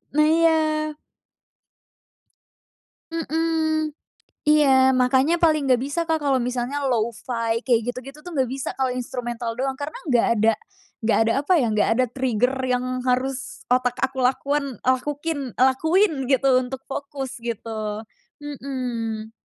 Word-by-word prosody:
Nah 305 0 +5
iya. 325 0 +4 2.5
Mmm, 320 -1 0 0.6
iya, 270 -3 +5
makanya 260 +5 +3
paling 310 -3 +4
nggak 255 -2 +3
bisa 285 +5 -2
Kak, 320 -1 0
kalo 280 -2 +2
misalnya 250 +2 -2
lo-fi, 230 -1 -1
kayak 240 -3 +4
gitu-gitu 265 +4 -7
tuh 355 - -9
nggak 260 -3 +1
bisa 270 0 -3
kalo 265 -1 +1
instrumental 240 -1 -4
doang. 265 +1 -1
Karena 290 +2 -5
nggak 245 -3 +3
ada 220 +2 +4 0.5
nggak 220 0 +2
ada - - +2
apa 330 +6 +2
ya, - - +2
nggak 210 - +2
ada 255 - +4
trigger 250 0 0
yang 250 0 0 0.2
harus 255 0 -1
otak 250 0 +2
aku 265 0 -1
lakuan 275 +1 0
lakukin 290 +5 0 0.2
lakuin 320 +10 +3 0.2
gitu, 270 0 +3
untuk 255 +1 -6
fokus 275 -1 -5
gitu. 220 -2 -4 0.4
Mhm, 245 -6 -4
260 Hz, 130 wpm, -23 LUFS, 245-290 Hz, 2.5 s, Nah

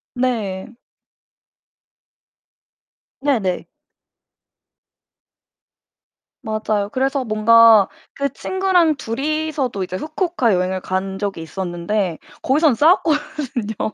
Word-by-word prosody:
네. 230 -5 -2 2.5
네네. 225 -11 0 2.8
맞아요. 215 -2 -1
그래서 270 +1 0
뭔가 225 -1 +6 0.3
그 280 - 0
친구랑 370 -4 +1
둘이서도 280 -2 -2
이제 185 0 -5
후쿠오카 310 - 0
여행을 185 +1 -1
간 190 +1 -3
적이 195 -4 -3
있었는데 175 +1 -3 0.2
거기선 290 0 +3
싸웠거든요. 295 - 0
230 Hz, 185 characters per minute, -20 LUFS, 195-290 Hz, 2.8 s, 뭔가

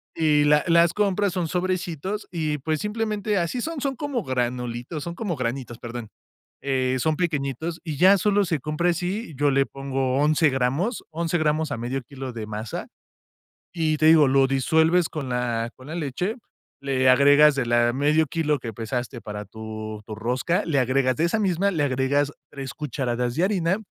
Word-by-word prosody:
Y 150 -2 +3
la 150 0 +4
las 170 +1 +5
compras, 205 -2 +1
son 180 -3 -1
sobrecitos 185 +2 -2
y, 155 -3 -2
pues, 155 +3 -1
simplemente, 210 -1 -1
así 175 +9 -2
son. 320 -2 -4
Son 275 -1 -1
como 275 -6 -3
granulitos, 125 +3 -3
son 170 0 -5
como 185 -5 -3
granitos, 120 -1 -4
perdón. 120 -1 -6 0.6
Eh, 130 -1 +1
son 155 +4 +1
pequeñitos 160 -1 -2
y 155 -5 -4
ya 190 +3 +7
solo 205 +1 +2
se 165 -3 0
compra 150 +5 -1
así, 180 +2 -2
yo 145 +1 +2
le 135 0 +2
pongo 135 -1 -2
11 150 +2 +3
gramos, 135 - -1
11 165 +2 -1
gramos 155 -1 +1
a 140 - -2
medio 120 +4 -3
kilo 135 0 -8
de 110 -2 -6
masa 110 +1 -5 0.9
y, 160 -3 0
te 155 - +1
digo, 160 -3 +7
lo 135 0 +4
disuelves 160 +6 +2
con 150 -4 -5
la 120 -2 -1
con 130 +2 -14
la 160 - -6
leche, 175 - -2 0.5
le 130 -2 +2
agregas 145 +3 +6
de 135 - 0
la 120 0 +3
medio 150 +3 +2
kilo 150 -1 0
que 115 -3 -6
pesaste 120 +2 -4
para 105 0 -6
tu 110 0 -7
tu 110 - -7
rosca, 125 - -1
le 160 -4 0
agregas 130 0 +2
de 160 - 0
esa 175 +6 +1
misma, 195 -1 +1
le 160 -6 -1
agregas 140 +1 +1 0.2
3 135 -3 -7
cucharadas 125 -4 -2
de 165 +7 0
harina 185 -2 +1
145 Hz, 180 wpm, -24 LUFS, 130-170 Hz, 0.9 s, ya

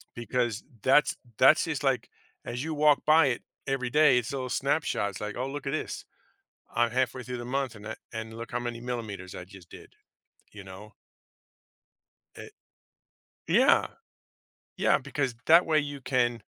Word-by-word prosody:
because 120 -1 -2 0.2
that's 135 +3 +4 0.2
that's 135 +4 +6
just 150 -3 -3
like, 135 -3 0 0.4
as 120 +2 -4
you 160 0 -3
walk 150 -1 +4
by 155 -1 +6
it 120 -3 -1 0.3
every 135 -2 -1
day, 150 -2 +5
it's 120 +1 -1
a - - -2
little 130 -1 -4
snapshot, 135 -6 0
it's 100 - -9
like, 105 0 -4
"Oh 130 +2 -2
look 140 0 -6
at - - -1
this. 155 - -4 0.7
I'm 120 -1 +2
halfway 125 +1 -1
through 125 0 -5
the 120 - -6
month 135 -1 -2
and 105 0 -10
i 110 - -5 0.2
and 110 0 -6
look 115 -1 -8
how 120 - -1
many 120 -1 -4
millimeters 110 -7 -5
I 90 - -7
just 95 -2 -15
did," - - -13 0.6
you 100 - -10
know? 95 +3 -12 1.4
It - - -11 0.9
Yeah. 245 - +4 0.9
Yeah, - - +3
because 135 -5 -3
that 165 +2 +7
way 155 -2 +3
you 145 -2 -5
can 120 -3 0
125 Hz, 170 wpm, -28 LUFS, 115-140 Hz, 1.4 s, that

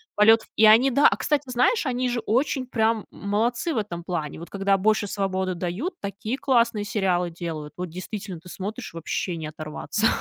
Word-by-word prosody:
полет 220 +2 +7
ф - - -19
и 220 - +5
они 230 +5 +7
Да, 280 +4 +6
а - - -1
кстати, 295 -1 0
знаешь, 255 - +2
они 255 -1 0
же 240 -1 -1
очень 255 +3 0
прям 225 -3 +1
молодцы 235 +10 -1
в - - -2
этом 175 -5 -3
плане, 160 -4 -3
вот, 170 - -9
когда 195 0 +1
больше 215 +1 +2
свободы 190 -2 -1
дают, 190 - -3
такие 215 +5 -4
классные 235 -6 +2
сериалы 190 -5 0
делают, 160 -3 -6
вот, 180 -1 -4
действительно, 185 +1 -6
ты 175 - -16
смотришь, 205 +2 -6
вообще 170 +2 -3
не 160 -2 -5
оторваться. 155 +8 -2
205 Hz, 190 wpm, -25 LUFS, 180-235 Hz, -, полет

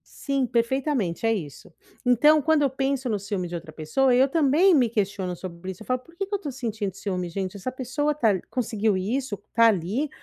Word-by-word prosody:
Sim, 275 -2 -1
perfeitamente, 235 - 0
é 225 - +3
isso. 155 -10 -7 0.3
Então 295 +6 +5
quando 315 +1 +2
eu 280 - +3
penso 270 -1 -1
no 210 - 0
ciúme 195 -2 -3
de 175 - -6
outra 165 -2 -8
pessoa, 245 - +1
eu 265 +2 +5
também 325 +5 +4
me 250 -5 +4
questiono 200 -4 -2
sobre 180 +1 -7
isso, 185 - -12
eu - - -11
falo: 255 0 0
"Por 335 +6 -20
que 390 +2 -3
que 405 - -9
eu 405 - +3
estou 295 -8 -6
sentindo 225 -6 -3
ciúme 185 -2 -3
gente? 190 +2 -4
Essa 200 +6 -4
pessoa 270 +4 -1
tá 245 -7 +2
a 190 -4 +1
conseguiu 220 -4 0
isso, 235 +6 -2 0.2
está 230 0 +4
ali, 215 - -1
235 Hz, 215 wpm, -25 LUFS, 190-275 Hz, 0.3 s, Então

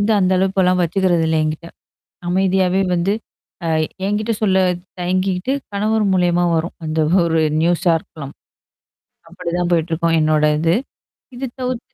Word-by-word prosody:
வந்து 210 +2 +2
அந்த 185 0 +2
அளவுக்கு 190 +1 +1
எல்லாம் 180 0 +2
வச்சிக்கிறது 175 -1 +1
இல்ல 160 - +1
எங்கிட்ட. 155 +2 -4 0.6
அமைதியாவே 190 0 +2
வந்து 180 +4 +1 0.5
அ - - -1 0.4
எங்கிட்ட 210 +3 -1
சொல்லத் 185 -3 +2 0.2
தயங்கிக்க்கிட்டு 185 +5 -1 0.2
கணவர் 215 +1 +1
மூலியமா 175 -1 +2
வரும். 165 +1 -2
அந்த 155 0 -3 0.3
ஒரு 165 -1 +1 0.2
நியூஸா 170 0 +2
இருக்கலாம். 140 -3 -10 0.9
அப்பிடித்தான் 175 0 -3
போயிட்டுருக்கும் 165 0 +1
என்னோட 155 0 +2 0.2
இது, 165 +2 +2 0.6
இது 265 - -3
தவிர்த்து 250 -2 -2
180 Hz, 130 wpm, -19 LUFS, 165-195 Hz, 0.9 s, வந்து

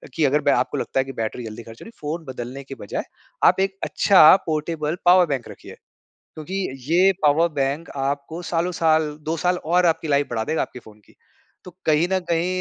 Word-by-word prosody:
कि 160 - +2
अगर 145 +2 +2
बे 145 - +2
आपको 125 - 0
लगता 135 - -2
है - - +3
कि 135 - -7
बैटरी 110 +2 -3
जल्दी 110 +2 -8
ख़र्च 115 0 -13
हो - - -10
रही 225 - -11
है, - - -30
फ़ोन 160 +2 -4
बदलने 125 +3 -7
के 135 0 -9
बजाए 100 - -5 0.4
आप - - +5
एक 195 0 -1
अच्छा 185 -4 +6
पोर्टेबल 155 +1 -2
पावर 180 +1 +6
बैंक 135 -5 -3
रखिए। - - -12 0.6
क्योंकि 155 +4 -8 0.4
ये 185 +3 +5
पावर 155 +3 +4
बैंक 140 +3 -2
आपको 140 +4 -3
सालों 175 +1 -1
साल 160 -2 +2
2 160 +2 -2
साल 180 +1 +1
और 175 +2 +3
आपकी 165 -1 +1
लाइफ़ 145 0 +1
बढ़ा 115 -2 -2
देगा 155 +1 -1
आपके 125 - -9
फ़ोन 110 -2 -17
की। - - -24 0.5
तो 180 - -10 0.2
कहीं 155 +3 +3
न 190 - +2
कहीं 170 +1 +1
155 Hz, 215 wpm, -22 LUFS, 135-170 Hz, 0.6 s, अच्छा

